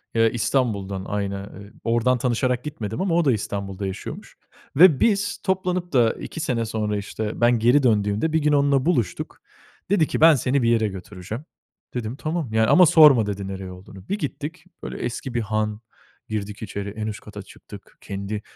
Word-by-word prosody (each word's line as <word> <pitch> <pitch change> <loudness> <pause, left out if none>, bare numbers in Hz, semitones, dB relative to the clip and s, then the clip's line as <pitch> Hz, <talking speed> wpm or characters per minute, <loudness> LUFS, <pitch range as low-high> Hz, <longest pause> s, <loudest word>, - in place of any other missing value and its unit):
Iıı, 115 0 +4
İstanbul'dan, 110 -5 -1
aynı, 100 -1 -2 0.3
eee, 100 - -13
ordan 120 +2 +2
tanışarak 125 0 0
gitmedim 110 - -5
ama 185 -3 +1
o 170 -1 +2
da 135 - +4
İstanbul'da 100 -2 -3
yaşıyormuş 95 +1 -8 0.4
ve 160 -2 +7
biz 205 -2 +1
toplanıp 185 -3 -1
da 120 -3 +4
2 - - -8
sene 125 -7 -1
sonra, 105 -2 -2
işte, 105 +2 -5
ben 120 -1 +4
geri 125 +5 +4
döndüğümde 105 +6 +1
bir 160 - +3
gün 150 -1 +2
onunla 140 -1 +3
buluştuk. 120 - -1 0.5
Dedi 180 -6 +3
ki: - - -3
"Ben 160 -2 +8
seni 130 +2 +1
bir 115 - +3
yere 110 -2 +3
götüreceğim." 95 - -7 0.5
Dedim 120 -1 -4
tamam 155 -4 -3
yani. 110 0 +3
Ama 180 +8 +7
sorma, 150 -8 +7
dedi, 100 -1 -4
nereye 95 -1 -6
olduğunu. 95 +2 -13
Bir 200 - 0
gittik, 155 +1 -5 0.2
böyle - - -6
eski 120 +1 -4
bir 120 - 0
han. 110 0 -2 0.5
Girdik 105 -1 -4
içeri, 100 -1 -5
en 110 +1 -5
üst 105 - -5
kata 105 -1 -9
çıktık. - - -14
Kendi, 100 +2 -5
115 Hz, 180 wpm, -23 LUFS, 105-140 Hz, 0.5 s, Ben